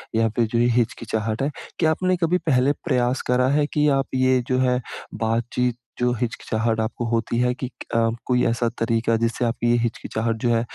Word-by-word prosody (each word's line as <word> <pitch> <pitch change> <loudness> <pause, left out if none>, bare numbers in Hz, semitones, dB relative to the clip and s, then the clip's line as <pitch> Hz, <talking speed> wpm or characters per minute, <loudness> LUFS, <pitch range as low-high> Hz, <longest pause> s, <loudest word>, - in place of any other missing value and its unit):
या 115 0 +3
फिर 120 - +3
जो 115 - +2
ये 120 - +4
हिचकिचाहट 110 -1 -1
है, 140 - +1 0.3
क्या 160 -2 +3
आपने 185 +3 +1
कभी 175 +1 +2
पहले 130 -1 +4
प्रयास 125 -4 +1
करा 125 +1 +3
है 145 +1 +2
कि 150 0 +3
आप 135 - -2
ये 130 0 +3
जो 130 - +1
है, 125 -1 +2 0.3
बातचीत 115 +2 -1 0.2
जो 125 0 +2
हिचकिचाहट 115 -1 -1
आपको 110 +2 -2
होती 115 0 0
है 125 0 +2
कि 130 +1 -5
क - - -12
अ, 115 0 +3 0.2
कोई 125 -1 +2
ऐसा 120 0 +1
तरीक़ा 115 0 +1
जिससे 115 +2 0
आपकी 120 0 0
ये 120 - +4
हिचकिचाहट 115 -1 -2
जो - - +3
है 115 - +2
120 Hz, 200 wpm, -23 LUFS, 115-130 Hz, 0.3 s, ये